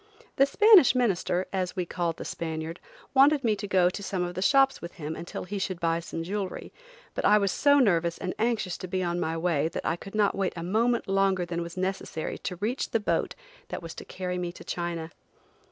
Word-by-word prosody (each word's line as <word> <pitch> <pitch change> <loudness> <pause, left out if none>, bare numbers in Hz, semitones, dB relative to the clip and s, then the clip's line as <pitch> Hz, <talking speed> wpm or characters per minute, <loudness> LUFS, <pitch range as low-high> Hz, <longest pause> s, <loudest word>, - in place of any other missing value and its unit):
The 275 0 +5
"Spanish 395 - +7
minister," 190 -6 +1
as 185 -1 -1
we 180 -2 -1
called 170 -1 -2
the - - -7
Spaniard, 160 0 -4 0.3
wanted 280 +1 +5
me 220 -3 +2
to 205 +1 -5
go 185 -3 +4
to 200 - -6
some 190 -2 -2
of 175 0 -3
the 185 - -4
shops 270 +6 +4
with 170 - -7
him 155 -2 -5
until 170 - -6
he 200 +2 -4
should 185 -2 -3
buy 165 0 +1
some 165 0 -5
jewelry, 195 +1 -4 0.4
but - - -3
I 210 - +6
was 200 -2 +1
so 285 0 +4
nervous 170 -9 +2
and 185 -1 -3
anxious 220 -5 0
to 185 - -6
be 185 +1 -1
on 175 0 -1
my 165 -1 -1
way 160 -3 +1
that 165 - -5
I 165 - +1
could 195 +4 -10
not 210 -1 +3
wait 195 -1 -1
a 170 - -5
moment 230 +6 +1
longer 195 -2 +2
than 170 0 -3
was 170 +1 -7
necessary 185 -4 -3
to 180 - -4
reach 215 +9 -2
the 225 - +1
boat 210 - -1 0.3
that - - -6
was 165 - -7
to - - -9
carry 180 -1 -4
me 175 -1 -3
to - - -12
China. 170 -2 -4
185 Hz, 225 wpm, -27 LUFS, 170-210 Hz, 0.4 s, Spanish